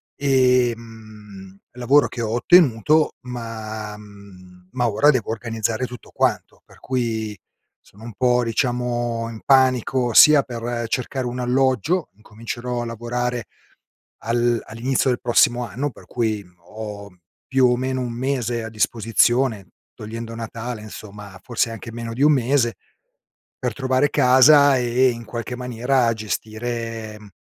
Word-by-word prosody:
ehm, 115 Hz, -7 st, -1 dB
lavoro 125 Hz, +4 st, +3 dB
che 120 Hz, -, -6 dB
ho 110 Hz, -, -2 dB
ottenuto, 150 Hz, -, +4 dB
ma 110 Hz, -3 st, -6 dB
mhmm, 95 Hz, -3 st, -16 dB
ma 120 Hz, -2 st, +1 dB
ora 145 Hz, +8 st, +3 dB
devo 125 Hz, -7 st, -2 dB
organizzare 115 Hz, +1 st, -2 dB
tutto 125 Hz, -3 st, -11 dB
quanto, -, -, -1 dB
per -, -, -20 dB
cui 110 Hz, -5 st, -3 dB, 0.4 s
sono 105 Hz, +3 st, -18 dB
un 115 Hz, -, -8 dB
po', 125 Hz, -1 st, +2 dB
diciamo, 120 Hz, -1 st, -1 dB
in 110 Hz, -1 st, -9 dB
panico 130 Hz, -2 st, +3 dB
sia 150 Hz, +3 st, +8 dB
per 120 Hz, -1 st, -4 dB
cercare 125 Hz, +2 st, -3 dB
un 125 Hz, +1 st, -5 dB
alloggio, 130 Hz, -, +1 dB
incomincerò 115 Hz, +3 st, -6 dB
a -, -, -5 dB
lavorare 120 Hz, 0 st, -3 dB, 0.8 s
al 120 Hz, +1 st, +1 dB
all'inizio 125 Hz, +4 st, -1 dB
del 120 Hz, -, -1 dB
prossimo 120 Hz, 0 st, +2 dB
anno 135 Hz, +8 st, -3 dB
per -, -, -17 dB
cui 110 Hz, -4 st, -2 dB, 0.3 s
ho, 105 Hz, -2 st, -7 dB, 0.4 s
più 130 Hz, -2 st, +3 dB
o 125 Hz, -, +2 dB
meno, 130 Hz, +1 st, -2 dB
1 120 Hz, -2 st, -3 dB
mese 120 Hz, -2 st, -2 dB
a -, -, -5 dB
disposizione, 115 Hz, 0 st, +1 dB, 0.3 s
togliendo 115 Hz, +1 st, -7 dB
Natale, 115 Hz, 0 st, -6 dB
insomma, 105 Hz, -2 st, -10 dB
forse 115 Hz, -2 st, -1 dB
anche 115 Hz, +1 st, -8 dB
meno 115 Hz, 0 st, -6 dB
di 130 Hz, +5 st, -3 dB
1 150 Hz, +1 st, +6 dB
mese, 125 Hz, -3 st, +1 dB, 0.8 s
per 125 Hz, -, -2 dB
trovare 130 Hz, +2 st, +1 dB
casa 140 Hz, +1 st, +6 dB
e 125 Hz, +1 st, +2 dB
in 115 Hz, -1 st, -5 dB
qualche 120 Hz, +2 st, -5 dB
maniera 125 Hz, 0 st, 0 dB
gestire 110 Hz, +1 st, -5 dB
mhmm, 105 Hz, -, -14 dB
120 Hz, 135 wpm, -21 LUFS, 110-125 Hz, 0.8 s, sia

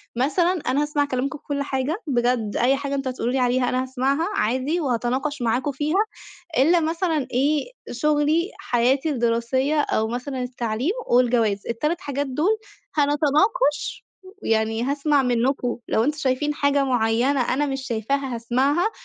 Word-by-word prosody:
مثلًا 310 Hz, +8 st, +2 dB
أنا 260 Hz, +3 st, +2 dB
هاسمَع 295 Hz, -1 st, 0 dB
كلامكم 265 Hz, 0 st, -2 dB
في -, -, -31 dB
كلّ 285 Hz, -1 st, -2 dB
حاجة، 280 Hz, -, -2 dB
بجد 240 Hz, -5 st, 0 dB
أي 255 Hz, +3 st, +4 dB
حاجة 280 Hz, 0 st, -3 dB
أنتم 270 Hz, -1 st, -2 dB
هتقولوا 250 Hz, -1 st, -2 dB
لي 265 Hz, -, +1 dB
عليها 250 Hz, 0 st, +2 dB
أنا 255 Hz, 0 st, 0 dB
هاسمَعها 265 Hz, +5 st, 0 dB
عادي 260 Hz, -, 0 dB
وهاتناقش 260 Hz, +2 st, -1 dB
معاكم 240 Hz, +5 st, 0 dB
فيها 305 Hz, +10 st, +1 dB, 0.5 s
إلّا 335 Hz, +6 st, +5 dB
مثلًا 325 Hz, -3 st, 0 dB
إيه، 290 Hz, -, +1 dB, 0.2 s
شُغلي، 300 Hz, -, +1 dB
حياتي 260 Hz, +5 st, +1 dB
الدراسية 260 Hz, +3 st, +1 dB
أو 220 Hz, -6 st, 0 dB
مثلًا 250 Hz, +2 st, -4 dB
التعليم 245 Hz, -, -2 dB, 0.2 s
والجواز. 235 Hz, -5 st, +2 dB
ال3 300 Hz, +9 st, -1 dB
حاجات 285 Hz, -4 st, -3 dB
دُول 315 Hz, +12 st, +1 dB, 0.4 s
هنتناقش 295 Hz, -, +1 dB, 0.4 s
ويعني 220 Hz, 0 st, +1 dB
هاسمَع 280 Hz, +1 st, +2 dB
منكم 245 Hz, 0 st, 0 dB
لو 220 Hz, -, +2 dB
أنتم 300 Hz, +3 st, -1 dB
شايفين 295 Hz, +1 st, 0 dB
حاجة 285 Hz, -1 st, +2 dB
معيّنة 245 Hz, +2 st, +1 dB
أنا 290 Hz, +3 st, +1 dB
مش 270 Hz, -1 st, -4 dB
شايفاها، 260 Hz, +3 st, -1 dB
هاسمَعها 265 Hz, -, +1 dB
270 Hz, 145 wpm, -23 LUFS, 245-295 Hz, 0.5 s, إلّا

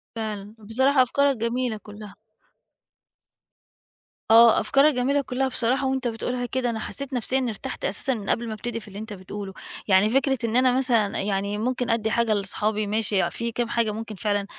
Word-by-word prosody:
فعلًا، 215 Hz, -1 st, -5 dB
بصراحة 260 Hz, +6 st, +2 dB
أفكارك 275 Hz, +1 st, +2 dB
جميلة 235 Hz, 0 st, -1 dB
كلّها. 205 Hz, -1 st, -11 dB, 2.1 s
آه، 230 Hz, 0 st, +8 dB
أفكارك 285 Hz, +2 st, +4 dB
جميلة 270 Hz, +3 st, +1 dB
كُلّها 265 Hz, 0 st, -1 dB
بصراحة 255 Hz, +2 st, 0 dB
وأنت 265 Hz, -1 st, -1 dB
بتقولها 245 Hz, +2 st, -3 dB
كده 250 Hz, 0 st, -1 dB
أنا 225 Hz, -1 st, -3 dB
حسّيت 275 Hz, +4 st, -4 dB
نفسيًا 255 Hz, +1 st, +1 dB
إنّي 250 Hz, -3 st, -1 dB
ارتحت 260 Hz, +5 st, -6 dB
أساسًا 270 Hz, -, 0 dB
من 210 Hz, -5 st, -6 dB
قبل 235 Hz, 0 st, 0 dB
ما 220 Hz, -, -4 dB
أبتدي 230 Hz, +1 st, -5 dB
في 215 Hz, -, -13 dB
اللي 200 Hz, +1 st, -9 dB
أنت 220 Hz, -1 st, -7 dB
بتقوله. 195 Hz, 0 st, -7 dB, 0.3 s
يعني 195 Hz, +2 st, +4 dB
فكرة 265 Hz, +2 st, +2 dB
إن 230 Hz, 0 st, -1 dB
أنا 255 Hz, 0 st, +4 dB
مثلًا 235 Hz, -6 st, +1 dB
يعني 200 Hz, +1 st, -1 dB
ممكن 245 Hz, +2 st, -1 dB
أدّي 220 Hz, -1 st, +1 dB
حاجة 235 Hz, -2 st, +2 dB
لصحابي 210 Hz, +1 st, -1 dB
ماشي، 210 Hz, -2 st, +1 dB
فيه 235 Hz, -1 st, -4 dB
كام 240 Hz, 0 st, -1 dB
حاجة 230 Hz, -2 st, +1 dB
ممكن 220 Hz, 0 st, -6 dB
فعلًا 205 Hz, +1 st, -1 dB
230 Hz, 175 wpm, -24 LUFS, 210-255 Hz, 2.1 s, آه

